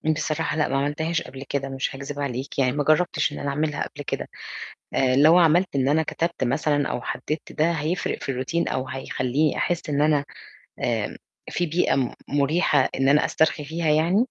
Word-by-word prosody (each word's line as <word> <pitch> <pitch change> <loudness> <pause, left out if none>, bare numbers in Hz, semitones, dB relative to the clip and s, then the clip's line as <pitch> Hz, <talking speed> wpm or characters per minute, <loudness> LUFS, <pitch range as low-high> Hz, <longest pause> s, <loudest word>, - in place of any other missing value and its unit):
بصراحة 155 +1 -1
لأ، 155 - +2
ما 135 - 0
عملتهاش 150 +4 -1
قبل 135 0 -8
كده 140 -1 -2
مش 135 0 -3
هاكذب 140 +1 -6
عليك، 135 0 -3
يعني 130 -2 +3
ما 145 +2 -1
جرّبتش 155 0 +2
إن - - -6
أنا 140 - -2
أعملها 150 +1 -1
قبل 145 - -9
كده. - - -3 0.7
آآ 130 -1 +3
لو 155 +5 +7
عملت 175 0 +4
إن 135 -1 +2
أنا 155 +3 +3
كتبت 170 +1 -2
مثلًا 145 +3 +1
أو 120 - -3
حدّدت 155 +5 -4
ده، 160 +3 +2
هيفرق 165 +2 -2
في - - -2
الRountine 170 +5 -1
أو 130 0 -2
هيخلّيني 130 +2 -1
أحس 175 -2 -1
إن 145 0 +1
أنا 150 -1 +3 0.6
آمم - - -1 0.3
في 175 - 0
بيئة 165 -1 +1
م 130 -3 0 0.2
مُريحة 145 0 +2
إن 135 0 +1
أنا 145 +2 +5
أسترخي 160 -1 +1
فيها 160 +2 -2
يعني؟ 160 +5 +3
145 Hz, 190 wpm, -24 LUFS, 135-160 Hz, 0.7 s, لو